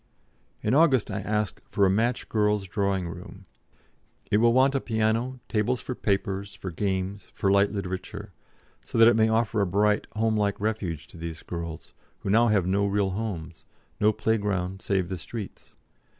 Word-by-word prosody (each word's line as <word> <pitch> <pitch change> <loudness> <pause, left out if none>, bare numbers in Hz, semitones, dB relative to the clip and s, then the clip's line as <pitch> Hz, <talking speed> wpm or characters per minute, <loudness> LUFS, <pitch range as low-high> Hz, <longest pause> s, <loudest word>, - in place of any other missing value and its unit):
In 105 - +1
August 140 -6 +4
I - - -2
asked 105 -2 -2
for 100 - +1
a - - +4
"match 115 +5 0
girls' 105 -2 +1
drawing 100 -2 -1
room." 95 +3 -10 0.9
"It 105 - +5
will 115 +2 +5
want 130 +3 +4
a 135 - 0
piano, 115 +3 0
tables 115 +3 0
for 130 - -4
papers, 100 -2 -2
for 95 - -6
games, 95 +2 -2
for 95 - +1
light 100 +1 +4
literature; 100 +1 -5 0.5
so - - -5
that 115 0 +8
it 120 - +6
may 110 0 +4
offer 110 -1 +1
a 100 - +2
bright, 105 +3 +2
homelike 110 -2 +1
refuge 100 -7 -2
to - - -13
these 80 -1 -6
girls, 85 -2 -6 0.3
who 95 - -2
now 115 +3 +5
have 105 -5 +2
no 100 +2 +1
real 100 -1 +1
homes, 90 -6 -5 0.3
no 105 +1 +4
playground 100 -4 -1
save 95 -3 0
the 95 -1 -5
streets. 110 +2 -8
105 Hz, 170 wpm, -26 LUFS, 95-110 Hz, 0.9 s, that